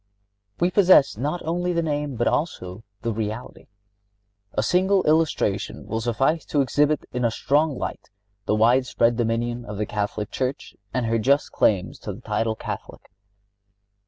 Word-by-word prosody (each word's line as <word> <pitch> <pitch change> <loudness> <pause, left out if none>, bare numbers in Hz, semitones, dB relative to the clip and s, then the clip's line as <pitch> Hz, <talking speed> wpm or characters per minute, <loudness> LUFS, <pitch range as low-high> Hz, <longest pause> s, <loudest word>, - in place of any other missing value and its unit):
(65) - - -26
We 175 +1 +3
possess 185 -8 +5
not 145 +10 -3
only 175 +2 -1
the 170 0 0
name, 145 -3 -2
but 120 - 0
also 105 - -2 0.2
the 115 -1 -1
reality. 110 +2 -5 0.9
A 105 - 0
single 190 - +3
illustration 155 -10 0
will 110 0 -3
suffice 135 +8 +1
to 145 - +1
exhibit 145 +3 +1
in 125 -1 -1
a 115 - +3
strong 145 +5 +1
light - - -5 0.4
the 105 - +2
widespread 120 +1 +3
dominion 120 +1 -1
of 105 -3 -7
the 105 - -1
Catholic 105 0 -3
Church 130 +1 -3 0.2
and 125 0 -1
her 115 0 +1
just 140 +6 +2
claims 95 -2 +1
to 105 - -5
the 110 - -11
title 110 0 -1
of - - -16
Catholic. - - -7
125 Hz, 160 wpm, -24 LUFS, 110-150 Hz, 0.9 s, possess